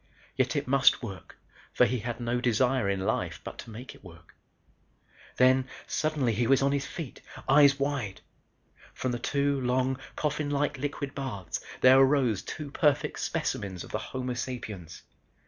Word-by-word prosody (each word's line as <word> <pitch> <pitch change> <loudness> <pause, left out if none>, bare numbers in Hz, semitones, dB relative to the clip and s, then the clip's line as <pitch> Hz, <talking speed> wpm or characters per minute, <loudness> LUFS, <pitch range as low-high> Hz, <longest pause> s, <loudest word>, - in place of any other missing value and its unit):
Yet - - +1
it - - -1
must 135 -1 +4
work 95 -5 -8 0.4
for - - +5
he 125 +2 -1
had 120 +2 -4
no 120 +1 -1
desire 125 -1 +2
in 100 -1 0
life - - -1
but - - -8
to - - -8
make 120 +4 -9
it - - -19
work. 85 -3 -15 1.0
Then, 130 +1 +4 0.2
suddenly, 150 -6 0
he 115 +2 +1
was 135 0 +4
on 140 - +3
his 140 -1 -1
feet, 160 -7 -7 0.3
eyes 140 0 +6
wide. 140 -8 -2 0.7
From 130 - -2
the 120 - -2
two 140 +1 0
long, 130 +1 +1 0.2
coffin 150 -1 -1
like 145 -1 0
liquid 140 0 -3
baths, 110 -11 -4 0.2
there 130 +1 +8
arose 130 -7 +3
two 150 -3 -7
perfect 145 -1 +1
specimens 95 -3 -2
of - - -11
the - - -1
Homo 125 -1 -4
sapiens. 115 -9 -6
130 Hz, 165 wpm, -28 LUFS, 120-140 Hz, 1.0 s, there